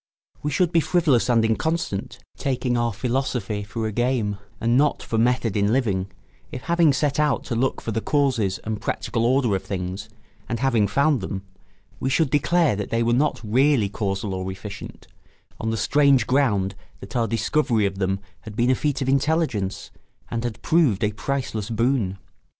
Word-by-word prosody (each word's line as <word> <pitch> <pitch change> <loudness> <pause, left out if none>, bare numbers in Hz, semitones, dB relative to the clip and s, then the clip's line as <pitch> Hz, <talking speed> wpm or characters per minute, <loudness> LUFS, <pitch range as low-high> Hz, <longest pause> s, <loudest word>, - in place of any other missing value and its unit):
We 150 - -1
should 170 +4 +1
be 170 - +4
frivolous 155 -8 +2
and 115 -2 +4
inconstant, 135 -1 -1 0.2
taking 130 -2 -1
our 120 -1 +1
philosophy 115 -2 -2
for 105 +2 -4
a 110 - -1
game 120 -3 0 0.2
and 115 +1 +2
not 145 +3 +2
for 115 - -1
method 120 -3 +1
in 100 0 +2
living, 100 -7 0 0.4
if 125 - -6
having 170 -2 +4
set 145 +1 0
out 150 -3 +2
to 120 - -3
look 130 +3 0
for 115 - -4
the 110 +1 -1
causes 130 -10 +1
and 110 -1 -4
practical 115 +1 -1
order 125 -5 +2
of 95 - -3
things, 95 +2 -4 0.4
and 115 - -2
having 120 -6 +2
found 140 +4 +2
them, 95 0 -4 0.6
we 130 - -1
should 145 +1 +2
declare 155 -1 +3
that 100 -1 -4
they 115 0 +1
were 120 +1 +2
not 145 +4 +1
really 125 0 +3
casual 100 -1 -2
or 95 0 -3
efficient, 95 +1 -9 0.5
on 110 - -2
the 115 - -1
strange 135 +2 +4
ground 110 -8 +1 0.3
that 100 +5 -10
our 115 -2 +2
discovery 115 0 +1
of 95 -1 -2
them 95 0 0 0.2
had 110 -2 -10
been 120 +2 +3
a - - +3
feat 140 0 -1
of - - -4
intelligence 135 - 0 0.4
and 115 0 -2
had 120 -3 -5
proved 145 - +3
a 105 - +2
priceless 115 -3 -3
boon. 115 -4 0
115 Hz, 180 wpm, -23 LUFS, 105-135 Hz, 0.6 s, be